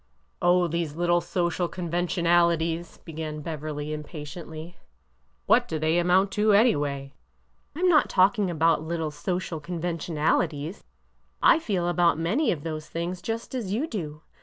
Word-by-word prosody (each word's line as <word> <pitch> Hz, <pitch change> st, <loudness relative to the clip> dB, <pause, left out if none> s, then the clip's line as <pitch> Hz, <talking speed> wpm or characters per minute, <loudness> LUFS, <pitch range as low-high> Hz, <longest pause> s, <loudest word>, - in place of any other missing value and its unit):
Oh, 175 Hz, 0 st, +4 dB
these 165 Hz, -2 st, -2 dB
little 175 Hz, +1 st, +2 dB
social 175 Hz, 0 st, -1 dB
conventionalities! 170 Hz, -1 st, 0 dB
" -, -, -31 dB
began 155 Hz, -2 st, -5 dB
Beverly, 150 Hz, -1 st, -4 dB
impatiently. 155 Hz, +2 st, -8 dB, 0.7 s
What -, -, +4 dB
do 160 Hz, -, -2 dB
they 160 Hz, +2 st, +2 dB
amount 185 Hz, +3 st, +3 dB
to, 210 Hz, 0 st, +3 dB
any 225 Hz, +2 st, +5 dB
way? 140 Hz, -1 st, -3 dB, 0.2 s
" -, -, -42 dB
" -, -, -42 dB
Lm 360 Hz, +4 st, +1 dB
not 320 Hz, -4 st, +4 dB
talking 195 Hz, +1 st, +3 dB
about 165 Hz, -1 st, +2 dB
little 160 Hz, -1 st, -3 dB
social 175 Hz, +2 st, -3 dB
conventionalities. 165 Hz, -1 st, -1 dB, 0.6 s
I -, -, +6 dB
feel 195 Hz, -, -1 dB
about 175 Hz, -3 st, +3 dB
many 200 Hz, -, +1 dB
of 150 Hz, -5 st, -4 dB
those 155 Hz, -2 st, -5 dB
things 175 Hz, +2 st, -4 dB
just 225 Hz, +5 st, -4 dB
as 220 Hz, -7 st, -3 dB
you 250 Hz, +8 st, 0 dB
do. 155 Hz, -, -6 dB
170 Hz, 150 wpm, -26 LUFS, 155-180 Hz, 0.7 s, I